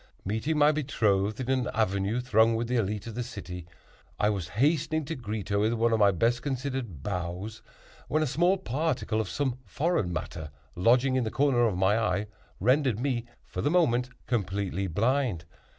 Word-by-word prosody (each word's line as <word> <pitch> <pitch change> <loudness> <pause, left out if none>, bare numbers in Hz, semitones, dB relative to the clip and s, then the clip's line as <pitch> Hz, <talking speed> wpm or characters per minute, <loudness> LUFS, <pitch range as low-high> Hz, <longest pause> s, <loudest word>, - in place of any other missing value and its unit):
Meeting 110 +11 -1
my 150 0 +6
betrothed 110 -8 0
in 125 - -4
an 130 -2 +1
avenue 100 +1 +1
thronged 115 -2 +3
with 115 +1 -2
the 125 - -2
élite 105 -2 -1
of 115 - -6
the 120 - -3
city, 95 -8 -7 0.5
I 105 - +3
was 95 -5 -3
hastening 155 +3 +2
to 165 - -3
greet 110 -4 -5
her 100 0 +2
with 110 +3 +2
one 115 0 +2
of 110 - +2
my 100 -1 +6
best 115 +6 +1
considered 130 - -4
bows, 95 +3 -4 0.5
when 155 +1 +1
a - - +1
small 175 +7 +2
particle 130 - -1
of - - -5
some 130 -3 -1
foreign 145 - 0
matter, 80 -1 -5 0.3
lodging 125 +8 +3
in 130 - +1
the 110 - -1
corner 130 -2 +3
of 100 -5 -1
my 95 +4 +3
eye, 100 -1 0 0.3
rendered 125 +1 +2
me, 125 -2 -1 0.2
for - - -5
the 145 - +1
moment, 125 -8 +2 0.2
completely 100 -4 -1
blind. 110 - 0
115 Hz, 180 wpm, -28 LUFS, 100-135 Hz, 0.5 s, my